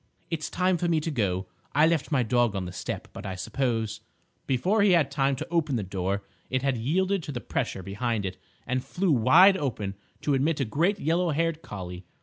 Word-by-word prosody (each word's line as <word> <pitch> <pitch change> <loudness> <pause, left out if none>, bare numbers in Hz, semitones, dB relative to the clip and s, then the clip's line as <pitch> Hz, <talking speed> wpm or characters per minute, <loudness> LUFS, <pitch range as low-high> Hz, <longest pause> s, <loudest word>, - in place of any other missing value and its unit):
"It's 155 -2 -2
time 185 0 +1
for 175 - 0
me 165 -2 +3
to 160 +1 -3
go. 95 -8 0 0.3
I 150 +2 +6
left 160 -2 +1
my 135 -4 +3
dog 120 -1 +2
on 95 -1 -2
the 90 - -6
step, 90 - -5
but 95 - -8
I 95 -3 -4
suppose—" 115 0 -2 0.5
Before 180 - +2
he 200 -2 +5
had 155 -5 +3
time 135 -1 +1
to 155 +5 -5
open 160 -5 +1
the 110 - -1
door, 95 +1 -2 0.3
it 130 0 0
had 135 -2 +2
yielded 185 - +1
to 150 - -6
the 125 - -4
pressure 95 - -3
behind 105 +2 -2
it 95 -1 -4 0.3
and 130 0 -1
flew 185 -1 0
wide 175 - +7
open 110 - -2 0.3
to 145 - +1
admit 145 +3 +1
a 135 - +1
great 170 - +1
yellow 170 +2 +1
haired 165 +1 0
collie. 90 - -8
135 Hz, 210 wpm, -27 LUFS, 105-165 Hz, 0.5 s, wide